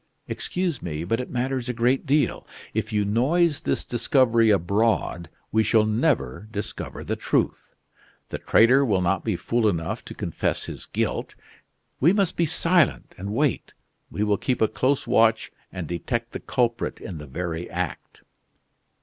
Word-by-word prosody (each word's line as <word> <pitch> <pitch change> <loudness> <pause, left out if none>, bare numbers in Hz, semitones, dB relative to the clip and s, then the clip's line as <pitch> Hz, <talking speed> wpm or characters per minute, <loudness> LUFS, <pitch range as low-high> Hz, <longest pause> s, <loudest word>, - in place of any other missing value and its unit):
"Excuse 180 -6 -2
me, 80 -1 -4
but 115 +7 0
it 125 - -4
matters 130 0 -2
a - - 0
great 125 +5 +1
deal. 140 -2 +1 0.3
If 110 +1 -2
you 105 -1 +1
noise 150 - +2
this - - -1
discovery 120 -3 +3
abroad, 100 -3 +1 0.2
we 110 - +3
shall 110 0 +3
never 110 - 0
discover 105 -1 -5
the - - -2
truth. - - -1 0.5
The - - -4
traitor 125 +5 +5
will 100 -8 +2
not 90 0 +1
be 110 -4 0
fool 115 +4 +1
enough 80 -3 -3
to - - -9
confess - - -1
his - - -8
guilt. - - -2 0.6
We 165 +8 +5
must 200 -4 +1
be 170 - +1
silent 170 -1 +2
and 100 +2 -4
wait. 135 +3 0 0.3
We 105 - -2
will 105 -1 +2
keep 125 -2 -1
a 110 - +4
close 135 +5 0
watch 110 0 +3 0.2
and 90 -4 -5
detect 115 - -3
the - - -5
culprit 120 -2 -1
in 85 -5 -7
the 75 - -9
very 85 +4 -4
act." - - -5
115 Hz, 160 wpm, -24 LUFS, 100-130 Hz, 0.6 s, traitor